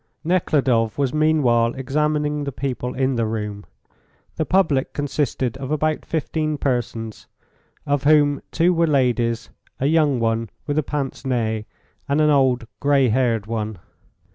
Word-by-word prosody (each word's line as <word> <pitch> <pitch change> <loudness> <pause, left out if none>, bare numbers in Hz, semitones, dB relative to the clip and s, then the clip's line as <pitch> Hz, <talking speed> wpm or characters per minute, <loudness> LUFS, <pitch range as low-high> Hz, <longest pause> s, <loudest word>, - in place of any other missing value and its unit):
Nekhludoff 135 - +1
was 140 -3 0
meanwhile 135 -7 +2
examining 150 +2 0
the 140 - -3
people 125 -2 -4
in 130 -1 0
the 115 -1 +1
room. 105 -2 -4 0.7
The 160 - -2
public 165 -8 +2
consisted 140 -3 -1
of 135 -1 -6
about 155 +1 -1
15 155 -1 -1
persons, 115 -5 -3 0.6
of 145 -1 0
whom 145 -1 +4
two 175 +2 +3
were 170 -1 +2
ladies 120 -5 +1 0.3
a 135 - 0
young 150 -3 +3
one 115 -1 0 0.2
with 145 +1 0
a - - 0
pince 135 -4 -4
nez, 110 -5 -1 0.4
and 140 +2 +2
an 150 0 +4
old, 130 -4 +3
grey 140 -3 +3
haired 115 -3 +1
one. 110 -2 -3
135 Hz, 140 wpm, -22 LUFS, 115-150 Hz, 0.7 s, whom